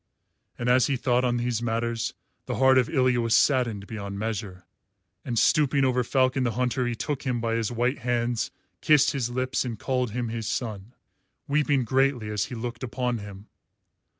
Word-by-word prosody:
And 120 Hz, -, -3 dB
as 125 Hz, -1 st, +4 dB
he 140 Hz, -, 0 dB
thought 125 Hz, 0 st, +1 dB
on 120 Hz, -1 st, +1 dB
these 120 Hz, -1 st, -1 dB
matters, 115 Hz, +1 st, -2 dB, 0.3 s
the -, -, -2 dB
heart 130 Hz, 0 st, +5 dB
of 125 Hz, -, 0 dB
Ilya 125 Hz, -2 st, +2 dB
was 115 Hz, -1 st, +2 dB
saddened 115 Hz, -6 st, +2 dB
beyond 100 Hz, -2 st, -6 dB
measure, 105 Hz, -4 st, -4 dB, 0.6 s
and 120 Hz, -2 st, -3 dB
stooping 140 Hz, +1 st, +3 dB
over 125 Hz, -1 st, +2 dB
Falcon 130 Hz, +1 st, +1 dB
the 120 Hz, -2 st, 0 dB
Hunter 125 Hz, +1 st, 0 dB
he 120 Hz, -, -2 dB
took 140 Hz, +3 st, -3 dB
him 125 Hz, -3 st, -1 dB
by 115 Hz, 0 st, -1 dB
his 115 Hz, -1 st, -1 dB
white 120 Hz, +3 st, 0 dB
hands, 120 Hz, -1 st, -1 dB, 0.3 s
kissed 150 Hz, -3 st, +5 dB
his 125 Hz, -4 st, -2 dB
lips 130 Hz, +1 st, -1 dB
and 120 Hz, -3 st, -4 dB
called 125 Hz, 0 st, -1 dB
him 120 Hz, +1 st, -3 dB
his 115 Hz, -1 st, -4 dB
son, 110 Hz, -2 st, -4 dB, 0.5 s
weeping 145 Hz, -2 st, +2 dB
greatly 130 Hz, -3 st, +1 dB
as 105 Hz, -, 0 dB
he 125 Hz, -, -7 dB
looked 120 Hz, 0 st, -5 dB
upon 125 Hz, -1 st, -2 dB
him. 100 Hz, 0 st, -10 dB
120 Hz, 180 wpm, -26 LUFS, 115-130 Hz, 0.6 s, heart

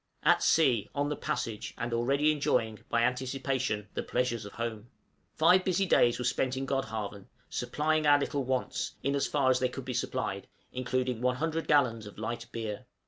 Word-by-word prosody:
_ -, -, +1 dB
At -, -, +5 dB
sea, 125 Hz, -10 st, +3 dB
on 145 Hz, 0 st, 0 dB
the 150 Hz, -, -1 dB
passage, 110 Hz, -5 st, -3 dB
and 115 Hz, 0 st, -3 dB
already 140 Hz, +6 st, +2 dB
enjoying, 115 Hz, -7 st, 0 dB
by 115 Hz, 0 st, +2 dB
anticipation, 130 Hz, -3 st, -1 dB
the -, -, -2 dB
pleasures 120 Hz, -3 st, -1 dB
of 100 Hz, -, -9 dB
home! 115 Hz, -1 st, -5 dB, 0.5 s
Five 180 Hz, +4 st, +5 dB
busy 190 Hz, +1 st, +1 dB
days 120 Hz, -9 st, +4 dB
were 125 Hz, -, -3 dB
spent 130 Hz, +1 st, 0 dB
in 135 Hz, -, -2 dB
Godhavn, 110 Hz, -7 st, -3 dB, 0.2 s
supplying 155 Hz, 0 st, 0 dB
our 145 Hz, 0 st, +7 dB
little 140 Hz, -1 st, -1 dB
wants, 130 Hz, 0 st, -2 dB
in 140 Hz, +1 st, +1 dB
as 140 Hz, -, +1 dB
far 130 Hz, -, +2 dB
as 130 Hz, -, +2 dB
they 130 Hz, -, +1 dB
could 130 Hz, 0 st, -7 dB
be 130 Hz, -, -3 dB
supplied, -, -, -2 dB, 0.3 s
including 125 Hz, -1 st, -1 dB
100 155 Hz, +6 st, 0 dB
gallons 115 Hz, -8 st, +2 dB
of 105 Hz, -, -12 dB
light 115 Hz, +2 st, -4 dB
beer. 110 Hz, -3 st, -5 dB
125 Hz, 185 wpm, -30 LUFS, 115-140 Hz, 0.5 s, our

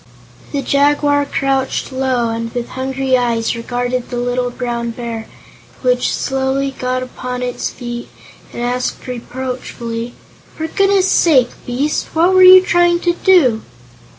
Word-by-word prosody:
The 280 Hz, -2 st, -2 dB
Jaguar 285 Hz, 0 st, +2 dB
crouched 270 Hz, -1 st, -1 dB
low 260 Hz, -3 st, 0 dB
and 230 Hz, 0 st, -4 dB
with 240 Hz, -1 st, -3 dB
hungry 265 Hz, 0 st, -1 dB
eyes 235 Hz, -3 st, 0 dB
regarded 245 Hz, +1 st, -3 dB
the 245 Hz, -, -4 dB
little 245 Hz, 0 st, -1 dB
Brown 240 Hz, -1 st, -3 dB
Bear, 230 Hz, -1 st, -6 dB, 0.6 s
which -, -, +2 dB
slowly 270 Hz, 0 st, -1 dB
got 255 Hz, 0 st, -1 dB
upon 250 Hz, 0 st, -5 dB
its 245 Hz, -1 st, -3 dB
feet 240 Hz, -1 st, -7 dB, 0.4 s
and 240 Hz, -, -5 dB
asked 245 Hz, +1 st, -2 dB
reproachfully: 245 Hz, -2 st, -5 dB, 0.4 s
"For 320 Hz, -, -4 dB
goodness' 390 Hz, +3 st, +2 dB
sake, 260 Hz, -8 st, +4 dB, 0.2 s
Beast, 270 Hz, +5 st, -1 dB
what 340 Hz, +3 st, +3 dB
were 370 Hz, -, +5 dB
you 370 Hz, 0 st, +9 dB
trying 345 Hz, -1 st, +3 dB
to 345 Hz, -, +1 dB
do?" 325 Hz, -12 st, +3 dB
255 Hz, 135 wpm, -17 LUFS, 245-285 Hz, 0.6 s, you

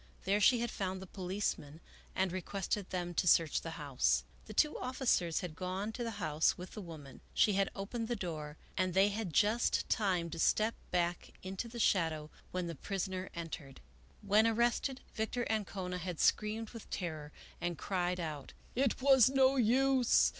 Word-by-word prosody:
There 200 Hz, +2 st, +2 dB
she 240 Hz, +3 st, +5 dB
had 235 Hz, -, -1 dB
found 190 Hz, -1 st, -3 dB
the 190 Hz, -, -8 dB
policemen 180 Hz, -5 st, -3 dB, 0.4 s
and 190 Hz, -1 st, +1 dB
re 185 Hz, +1 st, -3 dB
quested 195 Hz, +2 st, -3 dB
them 175 Hz, -1 st, -3 dB
to 180 Hz, -, 0 dB
search 165 Hz, -2 st, +4 dB
the 165 Hz, -1 st, -6 dB
house. 130 Hz, -, +1 dB, 0.2 s
The 215 Hz, -, -7 dB
two 300 Hz, +6 st, +3 dB
officers 250 Hz, -, +1 dB
had 175 Hz, -4 st, -6 dB
gone 185 Hz, +4 st, -3 dB
to 240 Hz, -, -4 dB
the 230 Hz, -3 st, -4 dB
house 155 Hz, -5 st, +1 dB
with 180 Hz, +1 st, -8 dB
the 210 Hz, -, -7 dB
woman. 155 Hz, -6 st, -10 dB
She 210 Hz, -, +4 dB
had 195 Hz, 0 st, +2 dB
opened 225 Hz, +4 st, -4 dB
the 240 Hz, -, -1 dB
door 155 Hz, -6 st, -5 dB, 0.2 s
and 185 Hz, -2 st, 0 dB
they 195 Hz, +2 st, +5 dB
had 210 Hz, 0 st, -3 dB
had 165 Hz, -, -8 dB
just 215 Hz, +6 st, +2 dB
time 180 Hz, -6 st, +1 dB
to 165 Hz, -, -5 dB
step 220 Hz, +6 st, +3 dB, 0.2 s
back 175 Hz, 0 st, -1 dB
into 190 Hz, +5 st, -4 dB
the 235 Hz, +1 st, -9 dB
shadow 160 Hz, -7 st, +1 dB, 0.2 s
when 180 Hz, -1 st, -2 dB
the 170 Hz, -, -4 dB
prisoner 190 Hz, +2 st, -3 dB
entered. 155 Hz, -5 st, -7 dB, 0.4 s
When 210 Hz, +2 st, +4 dB
ar 225 Hz, -, +1 dB
rested, 240 Hz, +3 st, +1 dB
Victor 225 Hz, +2 st, -2 dB
Ancona 190 Hz, -4 st, -2 dB
had 180 Hz, -2 st, -5 dB
screamed 215 Hz, +1 st, +1 dB
with 230 Hz, -3 st, -10 dB
terror, 155 Hz, -5 st, -4 dB, 0.3 s
and 175 Hz, -1 st, -2 dB
cried 180 Hz, 0 st, -1 dB
out, 155 Hz, -5 st, -5 dB
" -, -, -27 dB
It 260 Hz, 0 st, +1 dB
was 265 Hz, -3 st, +7 dB
no 270 Hz, 0 st, +4 dB
use 260 Hz, +1 st, +4 dB
190 Hz, 185 wpm, -34 LUFS, 170-220 Hz, 0.4 s, was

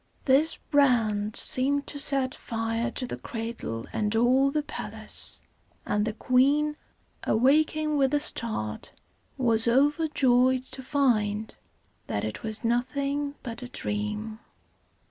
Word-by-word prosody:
This 290 Hz, +4 st, +3 dB
brand 225 Hz, -7 st, +2 dB
seemed 280 Hz, +2 st, +3 dB
to 285 Hz, -, -5 dB
set 275 Hz, -3 st, +4 dB
fire 225 Hz, +1 st, -3 dB
to 250 Hz, +1 st, -3 dB
the -, -, -6 dB
cradle 225 Hz, -, -5 dB
and 210 Hz, 0 st, -1 dB
all 255 Hz, +4 st, +4 dB
the 300 Hz, +1 st, -1 dB
palace; -, -, -4 dB, 0.4 s
and 210 Hz, 0 st, 0 dB
the 220 Hz, -, -2 dB
queen, 280 Hz, +6 st, +2 dB, 0.5 s
awaking 305 Hz, +5 st, +2 dB
with 270 Hz, -1 st, +2 dB
a -, -, +3 dB
start, 220 Hz, -, -2 dB, 0.4 s
was 230 Hz, -3 st, +2 dB
overjoyed 260 Hz, -2 st, +3 dB
to 265 Hz, -, -7 dB
find 220 Hz, -6 st, 0 dB, 0.5 s
that 100 Hz, -, -2 dB
it 110 Hz, 0 st, -4 dB
was 220 Hz, +1 st, -4 dB
nothing 280 Hz, +4 st, -1 dB
but 230 Hz, -2 st, -6 dB
a 250 Hz, -, -7 dB
dream. 210 Hz, +1 st, -4 dB
250 Hz, 125 wpm, -27 LUFS, 225-280 Hz, 0.5 s, set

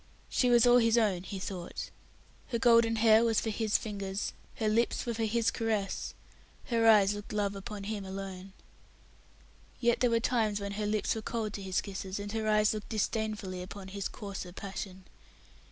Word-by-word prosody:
She 250 Hz, -, +2 dB
was 240 Hz, -1 st, +6 dB
all 245 Hz, 0 st, +7 dB
his 230 Hz, 0 st, +3 dB
own, 205 Hz, -6 st, +2 dB
he 195 Hz, +1 st, -6 dB
thought. 185 Hz, -2 st, -5 dB, 0.6 s
Her 240 Hz, -, -1 dB
golden 230 Hz, -1 st, +5 dB
hair 220 Hz, 0 st, +6 dB
was 225 Hz, -2 st, +3 dB
for 220 Hz, -, -2 dB
his 215 Hz, 0 st, +1 dB
fingers, 200 Hz, -2 st, -4 dB, 0.2 s
her 220 Hz, -, -1 dB
lips 230 Hz, +2 st, +1 dB
were 235 Hz, -, -1 dB
for 225 Hz, 0 st, -1 dB
his 230 Hz, +1 st, +1 dB
caress, 215 Hz, -4 st, -2 dB, 0.5 s
her 230 Hz, -2 st, +3 dB
eyes 205 Hz, -2 st, +6 dB
looked 205 Hz, 0 st, -7 dB
love 205 Hz, -1 st, -1 dB
upon 200 Hz, +1 st, -6 dB
him 205 Hz, 0 st, -4 dB
alone. 190 Hz, 0 st, -7 dB, 1.3 s
Yet 235 Hz, -1 st, +2 dB
there 250 Hz, -, +3 dB
were 230 Hz, 0 st, +3 dB
times 225 Hz, -3 st, +1 dB
when 200 Hz, 0 st, -4 dB
her 210 Hz, +1 st, -2 dB
lips 210 Hz, 0 st, +1 dB
were 220 Hz, -, -4 dB
cold 215 Hz, -1 st, -3 dB
to 200 Hz, -, -5 dB
his 190 Hz, -1 st, 0 dB
kisses, 195 Hz, 0 st, -5 dB
and 205 Hz, 0 st, -5 dB
her 220 Hz, 0 st, -2 dB
eyes 215 Hz, 0 st, +4 dB
looked 215 Hz, -1 st, -6 dB
disdainfully 215 Hz, -3 st, -2 dB
upon 190 Hz, +1 st, -8 dB
his 200 Hz, 0 st, -3 dB
coarser 195 Hz, -3 st, -7 dB
passion. 190 Hz, 0 st, -7 dB
210 Hz, 185 wpm, -31 LUFS, 195-225 Hz, 1.3 s, all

